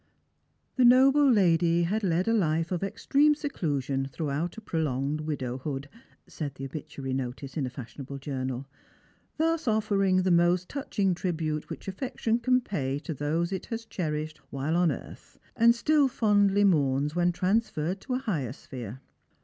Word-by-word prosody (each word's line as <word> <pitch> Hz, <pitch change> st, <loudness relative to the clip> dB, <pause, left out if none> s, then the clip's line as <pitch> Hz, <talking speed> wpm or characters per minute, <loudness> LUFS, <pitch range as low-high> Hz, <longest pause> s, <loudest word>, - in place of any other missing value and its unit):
" -, -, -46 dB
The 255 Hz, -, +4 dB
noble 270 Hz, +3 st, +6 dB
lady 170 Hz, -5 st, +3 dB
had 205 Hz, +6 st, 0 dB
led 180 Hz, +1 st, +1 dB
a 225 Hz, -, +3 dB
life 165 Hz, -5 st, +1 dB
of 180 Hz, -, -1 dB
extreme 275 Hz, +9 st, +2 dB
seclusion 145 Hz, -, -2 dB
through 140 Hz, +2 st, -4 dB
out 165 Hz, +8 st, -2 dB
a -, -, -7 dB
prolonged 150 Hz, -, -1 dB
widowhood," 135 Hz, -1 st, -4 dB, 0.4 s
said 145 Hz, -4 st, -6 dB
the 135 Hz, -, -6 dB
obituary 140 Hz, -1 st, -6 dB
notice 130 Hz, +1 st, -4 dB
in 140 Hz, -4 st, -1 dB
a -, -, -4 dB
fashionable 135 Hz, +2 st, -8 dB
journal; 130 Hz, -2 st, -4 dB, 0.4 s
" -, -, -36 dB
thus 325 Hz, -2 st, 0 dB
offering 200 Hz, -4 st, +2 dB
the 185 Hz, -, +2 dB
most 175 Hz, +1 st, +3 dB
touching 205 Hz, -9 st, -1 dB
tribute 160 Hz, -4 st, -2 dB
which -, -, -8 dB
affection 230 Hz, +2 st, -1 dB
can 255 Hz, +1 st, +3 dB
pay 140 Hz, -, -2 dB
to 160 Hz, +2 st, -5 dB
those 155 Hz, +5 st, -1 dB
it 190 Hz, -, -4 dB
has 230 Hz, 0 st, -5 dB
cherished 155 Hz, -6 st, -3 dB
while 140 Hz, +4 st, -2 dB
on 175 Hz, -2 st, +3 dB
earth, 130 Hz, -, -9 dB, 0.2 s
and 235 Hz, +1 st, +5 dB
still 295 Hz, +3 st, +3 dB
fondly 205 Hz, -5 st, +3 dB
mourns 145 Hz, -5 st, +2 dB
when 175 Hz, 0 st, +3 dB
transferred 185 Hz, -1 st, 0 dB
to 255 Hz, -, -3 dB
a 260 Hz, +1 st, -4 dB
higher 145 Hz, -, -1 dB
sphere. 125 Hz, -3 st, -8 dB
170 Hz, 165 wpm, -28 LUFS, 140-215 Hz, 0.4 s, noble